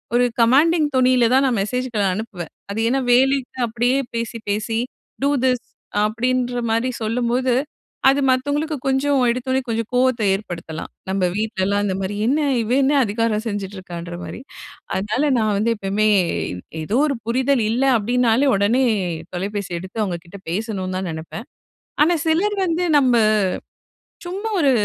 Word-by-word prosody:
ஒரு 245 +1 +4
கமாண்டிங் 295 +7 +4
தோணில 255 -2 +4
தான் 265 +1 +5
நான் 250 -4 +1
மெசேஜ்களை 240 0 -1
அனுப்புவேன். 195 -5 -6 0.2
அது 200 +2 -3
ஏன்னா 270 +3 +2
வேலைக்கு 260 +1 +2
அப்படியே 240 +3 +1 0.2
பேசி, 230 0 -3
பேசி, 215 +2 -1 0.4
"டூ 280 - +2
திஸ்" 250 -2 +2 0.4
அப்படின்ற 245 +2 0
மாதிரி 230 +3 +1
சொல்லும்போது, 240 +3 0 0.6
அது 275 +1 +3
மத்தவங்களுக்கு 285 +4 0
கொஞ்சம் 270 +1 +2
எடுத்தோனே 260 +2 0
கொஞ்சம் 230 -1 -2
கோவத்தை 250 -3 +2
ஏற்படுத்தலாம். 170 -5 -6 0.2
நம்ம 190 -1 +1
வீட்லலாம் 205 -2 0
இந்த 190 - -1
மாரி 195 +2 -3
"என்ன 280 +5 +2 0.2
இவ 225 - -3
என்ன 275 +2 +3
அதிகாரம் 220 0 0
செஞ்சுட்ருக்கான்ற 185 -4 -6
மாரி?" - - -7 0.6
அதனால, 210 +8 -1 0.2
நான் 215 -1 +1
வந்து 220 +3 +1
எப்பவுமே, 205 +2 0 0.8
ஏதோ 210 +10 0
ஒரு 275 -4 -1
புரிதல் 255 +1 +2
இல்லை 255 +4 +2
அப்படின்னாலே, 245 +4 +2
உடனே 215 +7 +2 0.5
தொலைபேசி 200 +1 -3
எடுத்து 190 +5 -4
அவங்க 180 -4 -3
கிட்ட 195 +4 -11
பேசணும்னு 190 -2 -3
தான் 190 - -3
நெனப்பேன். 165 - -7 0.6
ஆனா 340 +3 +4
சிலர் 375 +6 +2
வந்து 335 0 0 0.2
நம்ம, 255 -3 +3 1.1
சும்மா 395 +5 -4
ஒரு 280 - +4
230 Hz, 140 wpm, -21 LUFS, 205-260 Hz, 1.1 s, தான்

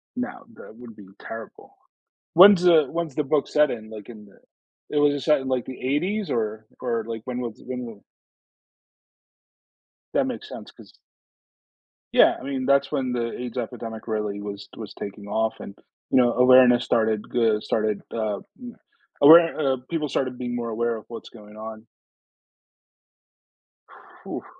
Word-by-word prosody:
No, 250 0 -5
that 110 - -13
would 120 -2 -12
be 100 -3 -14
terrible. 115 0 -10 0.6
When's 190 +1 +8
the 165 -5 +5
when's 165 -4 -3
the 150 - -1
book 145 +1 +1
set 150 -1 +3
in? 110 -2 -7
Like 110 -1 -10
in 105 -3 -12
the 100 +8 -14
eh, - - +4
was 145 0 +4
it 140 - -3
set 150 -2 +3
in 135 - -6
like 130 -2 -1
the 130 - -8
80s? 180 +10 -1
or 110 -1 -2
or 115 -3 -2
like 115 -1 -6
when 125 -1 -4
was 120 -3 -6
when 125 0 -5
w 110 -4 -10 2.1
That - - +2
makes - - -6
sense - - -10
'cause - - -17 1.2
Yeah, - - +6
I - - -12
mean, 135 -2 -3
that's 140 0 +3
when 130 -4 -1
the 120 -1 -2
AIDS 125 0 -6
epidemic 115 -2 -6
really 105 -2 -2
was 100 -1 -8
was 110 -3 -8
taking 100 0 -8
off 110 +1 -1
and, 100 - -9 0.4
you 130 - +5
know, 120 -1 +3
awareness 125 -1 +6
started 110 -2 +1
g 115 -3 +3
started, 110 -2 -1
uh, 110 -3 -2 0.2
m 240 -1 -9 0.5
aware 165 +3 +9
uh, 135 -3 +1
people 160 -3 -2
started 130 -2 -2
being 120 -1 -4
more 120 -1 -3
aware 115 +1 -1
of 110 - -9
what's 115 - -9
going 105 -1 -15
on. 110 +1 -9 2.4
Oof. - - -6
120 Hz, 165 wpm, -24 LUFS, 110-140 Hz, 2.4 s, aware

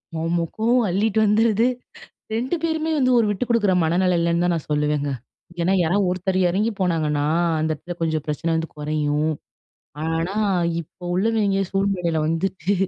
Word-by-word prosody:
ஆமா. 165 +1 0
கோவம் 235 +1 +2
அள்ளிட்டு 210 +4 +1
வந்துருது 220 +2 +3 0.7
2 245 +7 -1
பேருமே 320 -1 -1
வந்து 255 -1 +3
ஒரு 225 - +3
விட்டு 205 +4 -1
குடுக்குற 220 -5 +2
மனநிலைல 180 +3 +2
இல்லன்னு 170 +1 +1
தான் 175 - +2
நான் 165 - -5
சொல்லுவேங்க. 150 -1 0 0.5
ஏன்னா 185 - +2
யாராது 180 +5 +2
ஒருத்தர் 185 +1 -1
இறங்கி 205 +6 +1
போனாங்கன்னா 155 -5 0 0.3
அந்த 160 - 0
இடத்துல 175 +4 -8
கொஞ்சம் 160 -2 -1
பிரச்சனை 150 +3 -2
வந்து 160 0 -1
குறையும். 150 0 0 0.8
ஆனா 165 +4 -1 0.5
இப்ப 175 +3 -17
உள்ளவெங்க 200 0 +1
சூழ்நிலையில 195 -4 0
வந்துட்டு 180 +3 -1
180 Hz, 145 wpm, -22 LUFS, 160-205 Hz, 0.8 s, வந்துருது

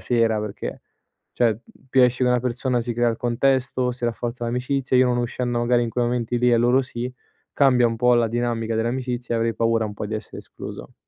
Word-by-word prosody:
sera." 115 -3 +1
Perché, 105 -1 -6 0.5
cioè 115 -3 +1 0.3
più 130 -1 +5
esci 125 +1 +2
co' 125 - +3
una 125 - +3
persona 125 0 -1
si 120 0 -3
crea 120 +1 +2
il 115 - -3
contesto, 130 +1 +1
si 125 0 -6
rafforza 120 +1 -3
l'amicizia, 125 +2 -1
io 130 0 +5
non 125 - +1
uscendo 120 0 -2
magari 120 0 +2
in 120 - -1
quei 120 +1 0
momenti 120 0 -1
lì 125 0 +3
e 120 - +5
loro 120 +3 +3
sì, 125 -1 -5 0.4
cambia 125 -4 +4
un 115 - -3
po' 125 +2 +4
la 120 -1 +2
dinamica 115 -1 -1
dell'amicizia 120 +1 -2
e - - +1
avrei 115 0 0
paura 115 -1 +1
un 105 - -7
po' 105 - -5
di 110 - -4
essere 110 0 -7
escluso. - - -9
120 Hz, 215 wpm, -23 LUFS, 115-125 Hz, 0.5 s, più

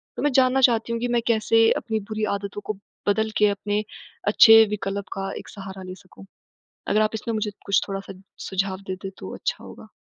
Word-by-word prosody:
तो - - -5
मैं 295 - +2
जानना 260 +1 +4
चाहती 235 -2 +3
हूँ 230 - -1
कि 245 - 0
मैं 240 -1 +1
कैसे 225 0 +4
अपनी 220 -1 -2
बुरी 215 0 -3
आदतों 200 0 -6
को 215 - -2 0.3
बदल 220 +2 +2
के 210 - +5
अपने 205 +1 -2 0.4
अच्छे 225 +1 +8
विकल्प 200 -1 -3
का 195 0 -4
एक - - -10
सहारा 195 -2 -9
ले 185 0 -8
सकूँ। 190 +1 -16 0.6
अगर 215 - +2
आप 215 0 +2
इसमें 225 +1 -4
मुझे 215 -1 -2
कुछ 200 - +3
थोड़ा-सा 195 0 -6 0.4
सुझाव 190 0 -1
देते, 190 +1 -5
तो 95 - -8
अच्छा - - -3
होगा। - - -12
210 Hz, 195 wpm, -24 LUFS, 195-225 Hz, 0.6 s, अच्छे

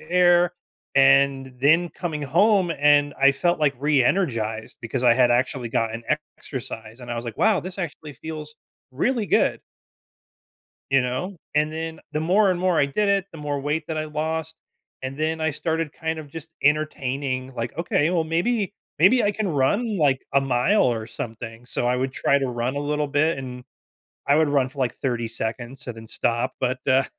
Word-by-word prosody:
air 175 +1 +4 0.4
and 135 -1 +4
then 160 +6 +4
coming 165 -3 -4
home, 180 +5 +3
and 145 0 +4
I 140 0 +6
felt, 175 +5 +1
like, 145 -2 +2
re-energized 125 - 0
because 115 +2 -3
I 120 -2 +6
had 125 -1 +4
actually 120 -1 0
gotten 115 0 -1
an 150 - +1 0.2
exercise. 115 -3 -8
And 120 -1 -8
I - - -2
was 120 - -4
like, 115 -2 -7
wow. 215 -4 +3
This 185 +1 -8
actually 155 -4 -5
feels 155 -1 -8 0.4
really 230 - 0
good. - - +2 1.3
You 135 - +5
know? 130 +10 -3 0.2
And 150 +1 +2
then 160 0 -5
the 150 - -1
more 190 +5 +3
and 175 - -2
more 185 -2 +2
I 140 - +4
did 200 +9 0
it, 195 -1 +2
the 165 - -10
more 145 -1 -3
weight 150 +2 -2
that 160 -1 -3
I 155 - -2
lost. 160 +1 -3 0.5
And 130 +2 -5
then 160 +1 -1
I 160 - +1
started 160 0 -2
kind 160 -1 -3
of 145 -2 -10
just 160 +1 -9
entertaining, 135 -3 0
like, 120 +3 -5
"Okay, 165 -2 +1
well, 170 -3 +1
maybe 200 +6 0 0.3
maybe 220 +7 +5
I 205 - +3
can 210 -1 -2
run, 200 - +1
like, 140 -4 +2
a 140 - +6
mile 135 +10 +2
or 115 -2 0
something." 115 -2 -7
So, 120 - -2
I 125 - +2
would 130 +1 -2
try 140 - +2
to 135 - -1
run 120 +2 -2
a 145 - -1
little 150 0 -1
bit, 145 +2 +1
and 125 -1 -7 0.6
I 140 - +4
would 155 -1 +3
run 135 -3 +2
for, 135 - -17
like, 125 - +1
30 120 -3 -2
seconds 120 +4 -5
and 120 -2 -6
then 110 0 -10
stop. 120 +2 -1
But, 125 0 0
uh 130 +1 +4
145 Hz, 190 wpm, -24 LUFS, 130-165 Hz, 1.3 s, I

